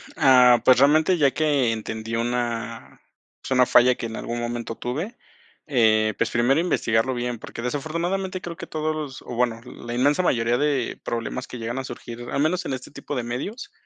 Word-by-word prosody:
Ah, 125 -2 +6
pues, 130 - +6
realmente, 155 +6 +4
ya 140 -4 +4
que 145 -6 +1
entendí 110 0 -4
una 120 0 -3 0.4
es - - -8
una 130 -1 +5
falla 125 +1 +5
que - - -5
en 110 -1 -5
algún 120 0 -4
momento 120 -1 -4
tuve. 160 - -4 0.5
Eh, 110 -6 +3
pues, - - +1
primero, 120 +5 +2
investigarlo 130 -8 +1
bien, 120 -1 -3
porque, 115 - -8
desafortunadamente, 170 +8 -2
creo 170 -1 -6
que - - -8
todos 155 0 -2
los, 145 -4 -6
o - - -8
bueno, 120 -1 0
la 120 -1 -8
inmensa 145 +7 +3
mayoría 120 -7 +1
de 140 -3 0
problemas 120 +2 -4
que 125 - -8
llegan 120 +3 -4
a - - -4
surgir, 120 -1 -8
al 140 - 0
menos 175 +4 +1
en - - -2
este 130 -1 -7
tipo 145 - -6
de 125 - -2
medios, 130 - -5
125 Hz, 190 wpm, -24 LUFS, 120-150 Hz, 0.5 s, Ah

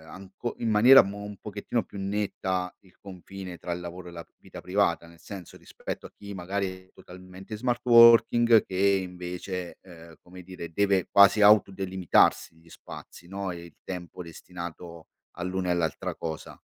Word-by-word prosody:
anco 95 +5 -7
in 115 - -1
maniera 120 +6 +8
mo 100 +1 -7
un 105 0 -8
pochettino 105 +3 -4
più 100 - -12
netta 95 -2 -3
il 95 -2 -24
confine 95 -1 -10
tra 85 - -5
il 90 - -6
lavoro 90 +1 -9
e - - -9
la 85 -1 -9
vita - - -12
privata, 90 -3 0
nel 85 -1 -18
senso 95 0 -10
rispetto - - -8
a - - -12
chi 100 0 -10
magari 95 +2 -3 0.2
è - - -34
totalmente 95 +2 -14
in 105 - -6
smart 120 0 -1
working, 115 -1 +6
che 95 - -8 0.3
invece, 90 0 -7
ehm, 85 -3 -15
come 90 +1 -13
dire 90 -2 -9
deve 100 0 +1
quasi 100 +1 +6
auto 105 -1 +6
delimitarsi 95 -3 +1
gli 80 +1 -22
spazi, 85 - -12
no, 95 0 -5
e 85 -1 -9
il 85 - -16
tempo 90 -1 -7
destinato 85 0 -10 0.3
all'una 90 +1 -3
e - - +2
all'altra 80 -3 -2
cosa. 80 -1 -7
95 Hz, 170 wpm, -26 LUFS, 85-100 Hz, 0.3 s, maniera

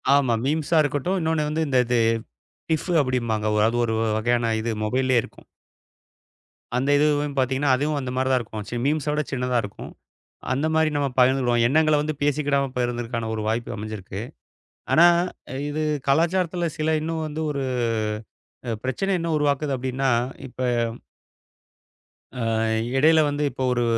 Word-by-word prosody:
ஆமா. 135 -4 +3
மீம்ஸா 155 +3 +1
இருக்கட்டும், 145 +6 -1
இன்னொன்னு 160 -2 0
வந்து 160 +1 0
இந்த 130 -2 +1
இது 120 0 +1 0.7
கிஃபு 160 +3 0
அப்படிம்பாங்க. 120 -5 -1
வ 105 - +3
அது 115 +1 0
ஒரு 115 - -1 0.2
வகையான 120 +1 +1
இது 115 +1 -2
மொபைல்லயே 130 +2 +2
இருக்கும். - - -14 1.3
அந்த 135 +3 0
இதுவும் 145 -1 +1
பாத்தீங்கன்னா, 135 +2 +1
அதுவும் 145 +2 -1
அந்த 130 -1 -4
மாதிரி 130 +1 0
தான் 130 - +3
இருக்கும். 110 -2 -7
சி - - -5
மீம்ஸ 150 0 0
விடச் 150 -3 -2
சின்னதா 125 -1 0
இருக்கும். 100 - -8 0.6
அந்த 140 +4 0
மாதிரி 160 0 +3
நாம 140 -1 +1
பகிர்ந்து 130 +1 +4
கொள்வோம். 120 -1 +2
எண்ணங்களை 155 +2 +3 0.3
பேசிக்கிடாமா 145 -1 +1
பகிர்ந்துகிறதற்கான 120 -2 -2
ஒரு 110 - -3
வாய்ப்பு 115 +2 -2
அமைஞ்சிருக்கு. 105 -2 -6 0.7
ஆனா, 170 - +7 0.6
இது 155 +1 -2 0.3
கலாச்சாரத்துல 170 +3 +1
சில 155 +1 +1
இன்னும் 160 0 -2
வந்து 155 +1 -5
ஒரு, 140 -2 -2 1.1
அ - - 0
பிரச்சனை 130 +10 -1
என்ன 165 0 -2
உருவாக்குது 145 -1 0
அப்படின்னா, 130 +1 -1 0.4
இப்ப 125 - -12 1.8
ஆ - - -1 0.5
இடையில 160 +4 +5
வந்து 145 +1 -2
இப்போ 130 - -4
ஒரு 120 -1 0
135 Hz, 145 wpm, -24 LUFS, 120-150 Hz, 1.8 s, ஆனா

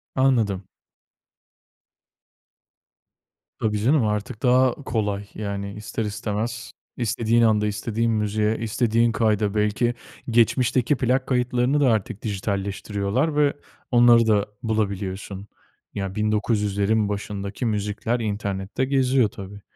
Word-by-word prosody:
Anladım. 115 -8 +2 3.0
Tabii, 105 -1 0
canım, 135 -2 +3
artık 105 +2 -3
daha 125 0 +4
kolay. 105 -7 -2
Yani, 100 -1 -4
ister 110 +1 -4
istemez 110 +2 -4 0.3
istediğin 115 0 +1
anda, 105 -2 +3
istediğin 115 +2 -1
müziğe, 105 0 0
istediğin 115 +1 +1
kayda, 105 -2 +1
belki 105 +3 +1 0.4
geçmişteki 120 +3 +3
plak 130 +1 0
kayıtlarını 125 +2 +1
da 135 -3 +4
artık 105 -1 -2
dijitalleştiriyorlar 100 - -2
ve 145 -1 +3 0.4
onları 120 -1 +6
da 105 -2 +3 0.2
bulabiliyorsun. 100 -2 -3 0.5
Ya, 95 -1 -4
1900'lerin 105 -1 +1
başındaki 100 +2 -4
müzikler 105 +2 -1
internette 100 +2 -2
geziyor, 130 -4 +2
tabii. 100 +1 -10
110 Hz, 100 wpm, -23 LUFS, 100-120 Hz, 3.0 s, onları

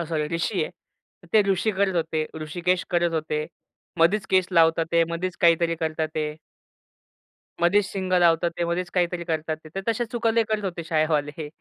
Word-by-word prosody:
अ, - - -1
sorry 155 -2 -1
रिशी 170 +3 -1
आहे. - - -7 0.6
ते 215 -1 +6
रुषी 195 +3 +2
करत 190 -1 +1
होते. 160 -1 -1
ऋषिकेश 175 +4 -1
करत 175 -1 +1
होते. 155 -1 -2 0.5
मधीच 190 +5 +3
केस 185 -1 +4
लावत 165 -1 +4
आहे, 170 0 +4
मधीच 175 +1 -3
काहीतरी 170 0 +4
करत 160 -1 -3
आहेत. 155 -1 -2 1.3
मध्येच 190 +4 +4
सिंग 185 -1 -4
लावत 170 -2 +4
आहे, 170 0 -1
मध्येच 175 +1 -2
काहीतरी 175 -1 0
करत 160 -2 -3
आहे. 155 0 -4
तर 195 - -2
तशा 235 +2 -1
चुका 230 -1 +1
लय 230 0 +3
करत 215 -1 -1
होते 175 -3 -4
शाळेवाले 155 -2 0
170 Hz, 175 wpm, -24 LUFS, 160-185 Hz, 1.3 s, ते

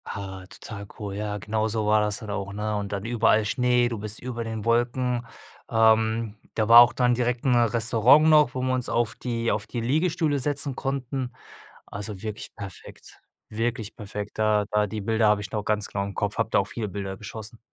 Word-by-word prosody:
Ah, 95 -2 -7
total 100 +1 -9
cool. 100 -2 -5
Ja, 105 0 -3
genauso 110 +1 -1
war 105 0 +4
das 105 -1 0
dann 110 -3 -7
auch, 100 -1 -4
ne, 105 +1 -2
und 100 -1 -3
dann 100 0 -4
überall 115 -2 +3
Schnee, 125 +2 +2
du 115 -3 -4
bist 105 +1 -6
über 120 -2 -5
den 110 -2 -5
Wolken. 120 +1 +1 0.4
Ähm, 110 -1 +3 0.2
da 110 - +1
war 115 +1 +10
auch 120 -1 +5
dann 125 0 +2
direkt 120 0 -1
'n 125 -2 +4
Restaurant 120 +5 +4
noch 150 -4 +5
wo 130 - -2
wir 130 0 0
uns 125 -1 -1
auf 115 0 0
die 115 -2 -2
auf 105 0 -2
die 120 - -4
Liegestühle 155 +4 +1
setzen 140 0 -1
konnten. 135 -2 -3 0.5
Also 100 -1 -7
wirklich 110 0 -6
perfekt, 100 -4 -10 0.3
wirklich 115 0 -3
perfekt. 105 0 -7
Da 105 -1 +2
da 105 0 +2
die 110 +1 -5
Bilder 110 +2 +2
habe 105 -1 +3
ich 100 -1 -7
noch 105 -1 -2
ganz 105 -1 0
klar 100 - -3
im 100 - -7
Kopf, 105 0 -2
habe 110 - +1
da - - +3
auch 100 - -1
viele 110 +1 -4
Bilder 95 0 -5
geschossen. 110 +2 -9
110 Hz, 205 wpm, -25 LUFS, 105-120 Hz, 0.5 s, war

